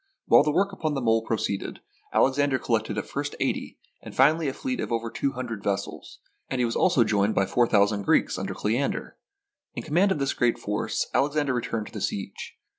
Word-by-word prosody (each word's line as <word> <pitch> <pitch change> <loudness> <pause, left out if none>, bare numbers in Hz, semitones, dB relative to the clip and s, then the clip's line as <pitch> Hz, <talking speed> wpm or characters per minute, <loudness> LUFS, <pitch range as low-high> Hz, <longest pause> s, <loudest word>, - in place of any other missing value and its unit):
While - - +7
the 150 +1 +1
work 195 +6 +1
upon 155 -6 -2
the 135 - -2
mole 115 -1 +3
proceeded, 105 -3 -2 0.3
Alexander 135 0 +2
collected 110 -3 -1
at 105 - -2
first 145 +1 -4
eighty, - - -2 0.2
and - - -10
finally 155 +4 +4
a 135 - -1
fleet 255 -1 -3
of - - -3
over 115 -1 -2
two 140 - -1
hundred 120 -5 -5
vessels, 100 -1 -3 0.3
and 130 - -2
he 125 - +2
was 115 - -2
also 140 -9 +4
joined 105 -1 +1
by 95 - +3
four 120 +5 +2
thousand 100 -1 +3
Greeks 100 - +2
under - - -4
Ole 105 +2 0
ander. 140 +3 -2 0.6
In - - -4
command 180 +6 +2
of 190 - +1
this 140 -1 0
great 120 -2 +1
force, 105 0 -2
Alexander 145 -1 +1
returned 115 -3 -2
to - - -12
the 105 - -6
siege. 100 0 -4
120 Hz, 205 wpm, -26 LUFS, 110-145 Hz, 0.6 s, While